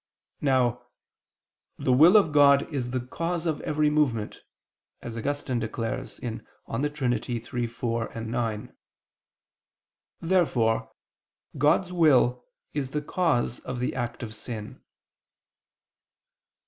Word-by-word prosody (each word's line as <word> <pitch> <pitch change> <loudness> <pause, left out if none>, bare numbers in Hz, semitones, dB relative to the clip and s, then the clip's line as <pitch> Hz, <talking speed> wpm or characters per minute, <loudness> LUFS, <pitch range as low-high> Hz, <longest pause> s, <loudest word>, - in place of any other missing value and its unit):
Now 125 -4 +1 0.9
"the 130 - +1
will 165 +10 +8
of 190 -7 +3
God 140 -1 +5
is 125 -4 -2
the 130 +1 -1
cause 165 +7 -3
of 160 -3 -1
every 150 0 +1
movement," 130 -8 0 0.6
as 115 - -7
Augustine 135 0 -2
declares 115 +3 -4
(De 115 -2 -5 0.5
Trin. 135 -5 0 0.2
iii, 120 +1 -2
4, 115 -1 -3
9). 115 -1 -3 1.4
Therefore 120 -11 +1 0.6
God's 150 +6 +2
will 130 -7 +4 0.3
is 140 -3 -2
the 150 +2 -3
cause 145 -8 0
of 130 -1 -6
the 125 +1 -1
act 120 0 -4
of 110 -2 -6
sin. 110 -1 -7
130 Hz, 110 wpm, -27 LUFS, 115-150 Hz, 1.4 s, will